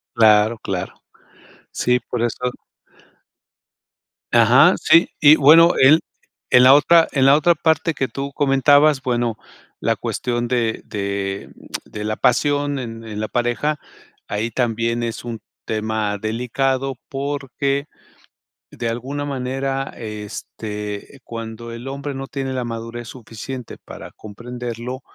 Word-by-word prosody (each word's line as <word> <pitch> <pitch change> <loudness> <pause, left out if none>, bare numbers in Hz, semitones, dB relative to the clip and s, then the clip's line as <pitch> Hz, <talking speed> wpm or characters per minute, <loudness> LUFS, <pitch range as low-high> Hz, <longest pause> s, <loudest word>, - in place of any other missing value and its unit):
Claro, 110 0 +5
claro. 95 -2 -4 0.8
Sí, 125 0 +1
por 120 -1 -1
eso 125 +2 -1 1.8
Ajá, 120 +9 +6
sí, 165 - +5
y 150 +1 +8
bueno, 165 +4 +7
el 145 +5 +6 0.5
En 125 - +6
la 130 +2 +8
otra 165 +3 +5
en 135 -2 +2
la 140 +1 +7
otra 170 +3 +3
parte 160 +1 +1
que 135 -2 -1
tú 140 0 -5
comentabas, 145 +1 +4
bueno, 120 -4 -1 0.4
la - - +1
cuestión 120 -1 -2
de 115 -3 0
de 100 -1 -4 0.4
de 105 - -7
la 110 0 -2
pasión 145 +3 +1
en 115 -2 -7
en 105 -2 -6
la 110 - -2
pareja, 125 +5 -1 0.5
ahí 110 +3 -2
también 115 0 -1
es 115 0 -4
un 115 -2 -5 0.3
tema 110 -1 -2
delicado 130 +5 -1
porque, 140 0 -2 0.9
de 115 - -3
alguna 135 +5 -4
manera, 135 0 -3
este, 105 +1 -7
cuando 115 0 -7
el 120 +3 -8
hombre 140 +1 -5
no 135 0 -6
tiene 135 -1 -4
la 130 -1 -2
madurez 115 0 -6
suficiente 125 +1 -8
para - - -11
comprenderlo, 120 +3 -7
125 Hz, 125 wpm, -20 LUFS, 115-135 Hz, 1.8 s, y